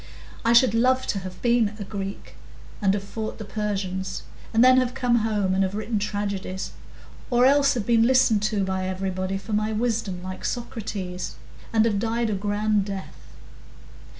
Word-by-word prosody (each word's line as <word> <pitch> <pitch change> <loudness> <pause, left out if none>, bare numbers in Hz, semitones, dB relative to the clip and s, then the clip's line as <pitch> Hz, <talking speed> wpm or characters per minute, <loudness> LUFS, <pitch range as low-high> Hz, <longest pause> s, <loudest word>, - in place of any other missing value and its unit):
I 230 - +4
should 235 -1 +6
like 255 +3 +3
to 200 - -1
have 185 -1 -8
been 235 -3 +2
a 210 - -5
Greek 195 0 -6 0.5
and 200 0 +2
fought 215 +2 -6
the 215 - -7
Persians, 195 -3 -3 0.3
and 225 +2 +4
then 255 0 +7
have 255 -1 +1
come 245 -2 +2
home 210 -4 +1
and 190 - +2
have 190 +1 0
written 215 0 -1
tragedies, 200 -2 -3 0.6
or 245 -1 +4
else 280 0 +5
have 225 -5 -2
been 230 0 +4
listened 255 -5 +4
to 205 -2 0
by 190 0 -2
everybody 185 0 -2
for 195 +3 -6
my 215 +1 +1
wisdom, 215 -5 -1
like 185 0 -7
Socrates, 205 -6 -4 0.4
and 225 -1 +4
have 210 -3 +1
died 230 +1 0
a - - 0
grand 205 +1 +1
death." 195 -1 -7
210 Hz, 170 wpm, -25 LUFS, 195-230 Hz, 0.6 s, then